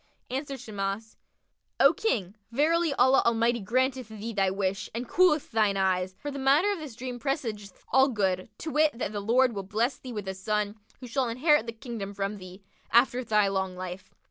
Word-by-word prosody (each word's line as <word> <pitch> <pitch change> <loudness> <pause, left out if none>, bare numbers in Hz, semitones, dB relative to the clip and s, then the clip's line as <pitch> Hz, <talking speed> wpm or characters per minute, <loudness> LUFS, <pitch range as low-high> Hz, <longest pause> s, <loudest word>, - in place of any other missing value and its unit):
Answered 275 +1 -3
Shimas, 210 -1 -4 0.6
"O 275 +3 +7
King, 205 - -1 0.2
verily 320 +5 +2
Allah 260 +1 +5
Almighty 235 +1 +2
granteth 255 +4 0
thee 220 +1 -6
thy 195 -2 +2
wish 195 0 -2
and 240 +1 -3
cooleth 360 -5 +3
thine 215 -3 +2
eyes; 185 -1 0
for 290 - -5
the 280 - -5
matter 285 +9 +4
of 400 - -3
this 295 -7 -8
dream 245 +1 -6
presageth 225 - -4
all 265 +2 +6
good, 190 -6 -1
to 315 - -5
wit, 300 -4 +2
that 220 - -2
the 205 - -3
Lord 240 +4 +3
will 200 - -3
bless 225 +7 -1
thee 255 - -8
with 210 -4 -5
a 190 - -2
son, 210 +2 -2 0.3
who 250 - -7
shall 255 0 0
inherit 255 +1 +3
the - - -2
Kingdom 225 -4 -7
from 200 +1 -2
thee, 185 +1 -12 0.3
after 245 +1 +4
thy 210 -3 +3
long 190 -1 -1
life. 185 0 -7
230 Hz, 195 wpm, -28 LUFS, 200-265 Hz, 0.6 s, O